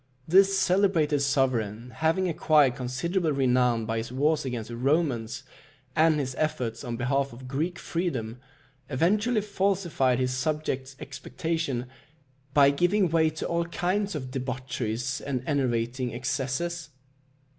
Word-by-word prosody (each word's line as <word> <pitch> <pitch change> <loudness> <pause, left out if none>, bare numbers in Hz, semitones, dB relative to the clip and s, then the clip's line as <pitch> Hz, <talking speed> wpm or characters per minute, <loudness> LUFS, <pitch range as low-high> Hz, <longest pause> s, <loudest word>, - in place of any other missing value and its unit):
This 195 +3 +5
celebrated 180 -6 +3
sovereign 125 -5 0
having 165 +4 +2
acquired 155 -5 +4
considerable 150 +7 -1
renown 125 -4 +2
by 115 0 -1
his 115 +1 -5
wars 145 +3 +1
against 120 -4 -4
the 120 - -5
Romans, 130 -3 0 0.5
and 155 -1 +4
his 130 -2 -2
efforts 145 -8 -1
on 120 -3 -4
behalf 135 +3 0
of 130 +2 -10
Greek 155 +7 -2
freedom, 125 -10 -3 0.5
eventually 210 - +2
falsified 190 -10 +1
his 130 0 0
subjects' 135 -1 -2
expectation 160 -7 -3 0.7
by 140 -1 +6
giving 180 +5 +2
way 160 0 +3
to 155 0 -5
all 170 0 0
kinds 185 +3 -1
of 130 -3 -5
debaucheries 125 -1 -3
and 130 -3 -3
enervating 125 -3 -1
excesses. 140 +6 -2
140 Hz, 125 wpm, -27 LUFS, 125-165 Hz, 0.7 s, by